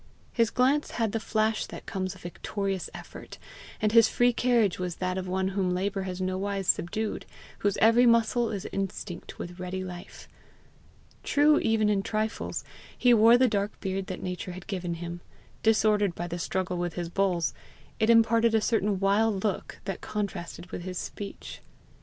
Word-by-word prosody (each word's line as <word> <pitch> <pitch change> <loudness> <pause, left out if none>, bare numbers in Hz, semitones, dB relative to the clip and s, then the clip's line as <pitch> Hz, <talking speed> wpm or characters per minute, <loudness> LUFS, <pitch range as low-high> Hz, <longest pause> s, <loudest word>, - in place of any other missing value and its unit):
His 230 -2 +3
glance 270 +4 +2
had 225 -3 +1
the 225 - -1
flash 220 0 0
that - - -9
comes 185 -1 -3
of 185 - -15
victorious 195 +2 -3
effort, - - -10 0.4
and 215 - +1
his 230 0 +6
free 245 0 +3
carriage 235 -6 +2
was 180 -2 -3
that 185 0 -2
of 185 0 -3
one 190 +1 0
whom 190 -2 0
labour 195 +1 -1
has 180 0 -5
nowise 190 +1 -2
subdued, 210 +5 -1 0.3
whose 205 -1 0
every 230 +3 +5
muscle 230 0 +3
is 200 -3 -4
instinct 195 -2 -5
with 175 +1 -7
ready 185 +1 -4
life. 180 -1 -9 0.9
True 295 +1 +4
even 225 -1 +2
in 205 -2 +2
trifles, 220 +1 -2 0.3
he 245 -1 +5
wore 230 +1 +7
the 255 +1 +4
dark 205 -2 -1
beard 190 -1 -3
that 185 - -6
nature 180 0 -4
had 185 +1 -9
given 180 -4 -3
him; 170 +1 -6 0.4
disordered 210 -4 +3
by 175 - -4
the 175 0 -5
struggle 185 +1 -2
with 175 -1 -3
his 175 -1 -3
bulls, 175 -4 +1 0.5
it 220 - +2
imparted 230 0 +5
a - - +5
certain 210 -3 +1
wild 200 +1 +2
look 210 -3 -3
that 195 -2 -4
contrasted 190 -4 -5
with - - -5
his 180 0 -5
speech. 200 +3 -7
195 Hz, 170 wpm, -28 LUFS, 185-225 Hz, 0.9 s, wore